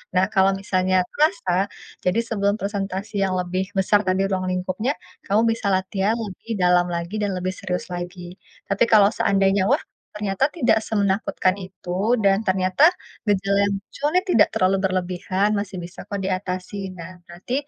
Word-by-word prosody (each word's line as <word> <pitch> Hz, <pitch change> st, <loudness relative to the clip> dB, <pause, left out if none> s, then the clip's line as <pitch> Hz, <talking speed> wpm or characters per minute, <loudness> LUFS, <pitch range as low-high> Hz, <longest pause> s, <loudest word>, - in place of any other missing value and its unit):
Nah 185 Hz, +1 st, +4 dB
kalau 190 Hz, 0 st, +4 dB
misalnya 185 Hz, -1 st, +1 dB
terasa, 305 Hz, -, +1 dB, 0.5 s
jadi 185 Hz, +5 st, +2 dB
sebelum 200 Hz, -2 st, +1 dB
presentasi 200 Hz, 0 st, -4 dB
yang 190 Hz, -, 0 dB
lebih 180 Hz, +1 st, -1 dB
besar 195 Hz, +1 st, +3 dB
tadi 185 Hz, +1 st, +2 dB
ruang 185 Hz, -1 st, -1 dB
lingkupnya, 185 Hz, +8 st, -1 dB, 0.3 s
kamu 205 Hz, +3 st, +2 dB, 0.2 s
bisa 210 Hz, -, -3 dB
latihan 190 Hz, +2 st, 0 dB
lebih 215 Hz, 0 st, -8 dB
dalam 180 Hz, -1 st, +4 dB
lagi 170 Hz, +3 st, -3 dB
dan 205 Hz, -, 0 dB
lebih 180 Hz, +1 st, -2 dB
serius 185 Hz, -2 st, -4 dB
lagi, 175 Hz, 0 st, -7 dB, 0.3 s
tapi 200 Hz, +2 st, +3 dB
kalau 210 Hz, -3 st, +6 dB
seandainya 195 Hz, -2 st, +2 dB
wah, -, -, +2 dB, 0.3 s
ternyata 210 Hz, +3 st, 0 dB
tidak 235 Hz, -9 st, +3 dB
semenakutkan 200 Hz, -2 st, 0 dB
itu 190 Hz, +3 st, -2 dB
dan 200 Hz, +2 st, +2 dB
ternyata 185 Hz, +7 st, +3 dB, 0.4 s
gejala 200 Hz, -1 st, +1 dB
yang 200 Hz, -, 0 dB
muncul 280 Hz, -, -7 dB
ini 365 Hz, -, +4 dB
tidak 225 Hz, -12 st, +5 dB
terlalu 190 Hz, +1 st, +2 dB
berlebihan 185 Hz, +1 st, 0 dB
masih 200 Hz, -2 st, -4 dB
bisa 175 Hz, +2 st, -9 dB
kok 200 Hz, -1 st, -4 dB
diatasi. 185 Hz, 0 st, -3 dB
Nah 180 Hz, +1 st, -10 dB
nanti, 175 Hz, +8 st, -8 dB
190 Hz, 155 wpm, -23 LUFS, 185-205 Hz, 0.5 s, kalau